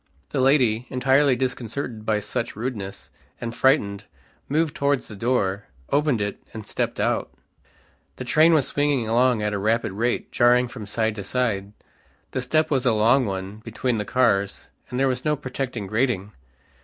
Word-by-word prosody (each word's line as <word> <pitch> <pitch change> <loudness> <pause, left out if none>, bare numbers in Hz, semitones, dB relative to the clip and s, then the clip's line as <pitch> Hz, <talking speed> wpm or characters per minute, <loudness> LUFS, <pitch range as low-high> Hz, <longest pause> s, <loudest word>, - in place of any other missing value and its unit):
The 130 - 0
lady, 125 -4 +3
entirely 135 +1 +3
disconcerted 125 -2 -4
by 105 -1 +1
such 115 +3 -3
rudeness, 105 -4 -5 0.3
and 115 0 -4
frightened, 100 -7 +2 0.4
moved 155 +1 +1
towards 140 -2 0
the 110 - -9
door, 100 -3 0 0.3
opened 145 -6 +2
it 100 - -4
and 110 -2 -7
stepped - - -2
out. - - 0 0.9
The - - -6
train 160 +2 +5
was 145 -4 +3
swinging 145 -4 0
along 120 -1 +3
at 105 0 -1
a 100 - -1
rapid 110 +2 +1
rate, 115 +5 -1
jarring 125 +1 +4
from 110 -5 -8
side 110 +1 0
to 100 - -4
side; 105 -3 -1 0.6
the 130 - -2
step 155 +5 +1
was 135 -3 +2
a 120 - +4
long 115 +4 +4
one 95 +1 -4
between 115 +1 -2
the - - -1
cars 100 -4 +1 0.2
and 125 - -3
there 135 - +3
was 130 -1 -1
no 150 0 +2
protecting 130 -5 -4
grating. 110 -2 0
120 Hz, 170 wpm, -24 LUFS, 105-130 Hz, 0.9 s, train